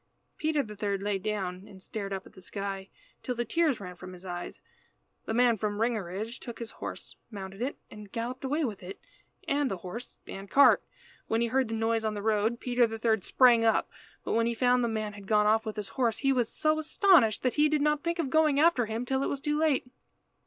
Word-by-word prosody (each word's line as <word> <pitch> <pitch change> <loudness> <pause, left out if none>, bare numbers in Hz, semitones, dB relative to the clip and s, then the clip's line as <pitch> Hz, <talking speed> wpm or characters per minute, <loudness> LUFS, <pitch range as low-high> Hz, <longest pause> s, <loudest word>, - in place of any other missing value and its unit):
Peter 310 -2 +1
the 210 -3 -9
third 200 -1 -2
lay 205 -1 0
down 190 -2 -3
and 190 - -13
stared 200 +1 -5
up 190 -1 -4
at - - -16
the 185 - -14
sky 195 +1 -5 0.3
till 250 - -3
the 240 0 -2
tears 300 +2 +1
ran 180 -3 -8
from 185 +1 -10
his 180 +1 -12
eyes. 175 -1 -6 0.7
The - - -2
man 240 -3 +4
from 210 -1 -1
Ringerige 220 0 -2
took 235 -3 -8
his 230 -1 -7
horse, - - -8
mounted 195 -1 -8
it, 265 +4 -2
and 210 -2 -11
galloped 245 +3 -4
away 295 +4 0
with 215 -6 -5
it 185 +2 -8 0.5
and 280 -1 +1
the 195 - -3
horse 190 +8 -8
and 195 0 -8
cart. 280 +5 +6 0.5
When 225 - +1
he 235 - +2
heard 260 +1 +2
the 225 - -3
noise 225 0 0
on 215 -1 -1
the 205 - -5
road, 220 +2 +1
Peter 245 -1 +2
the 225 0 -5
third 220 -3 +1
sprang 240 -3 +5
up, 225 -1 +2 0.3
but - - -2
when 230 +1 +2
he 235 - -1
found 250 +1 +3
the - - +2
man 215 -2 -3
had 200 -1 -11
gone 210 0 +4
off 220 +1 +3
with 215 - -3
his 210 -2 -5
horse 235 -4 0
he 275 -1 +2
was 245 -3 +1
so 310 0 +1
astonished 315 - +4
that 255 - +1
he 300 0 +3
did 300 -1 +1
not 300 0 +2
think 340 +1 -1
of 305 -6 -2
going 310 -2 +4
after 300 -7 +4
him 225 +3 -3
till 265 +1 0
it - - 0
was 280 - -3
too 295 +1 -1
late. 305 -5 +2
225 Hz, 235 wpm, -29 LUFS, 205-265 Hz, 0.7 s, cart